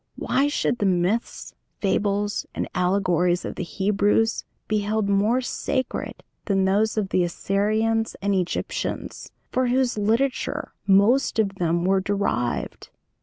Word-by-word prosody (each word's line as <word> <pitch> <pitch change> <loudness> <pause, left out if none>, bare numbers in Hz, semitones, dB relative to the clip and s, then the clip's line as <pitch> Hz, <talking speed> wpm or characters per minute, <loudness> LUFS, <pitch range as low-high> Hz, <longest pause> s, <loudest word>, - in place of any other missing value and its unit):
Why 275 +2 +1
should 245 -4 0
the 205 - +2
myths, 185 +5 -1 0.3
fables, 205 +1 0
and - - -2
allegories 180 -1 +1
of - - -4
the - - -6
Hebrews 205 +4 +1 0.2
be 215 -1 +1
held 210 0 -1
more 210 +5 +2
sacred 260 +1 -3 0.2
than 195 -2 +1
those 210 +3 +1
of 200 -3 0
the 185 - +2
Assyrians 215 +5 0
and 200 0 0
Egyptians, 180 -2 -3 0.2
from 255 0 +1
whose 250 -2 +1
literature 230 +6 0
most 205 +8 +4
of 205 -3 +1
them 170 0 +1
were 190 0 +3
derived? 190 - -2
205 Hz, 130 wpm, -24 LUFS, 190-225 Hz, 0.3 s, most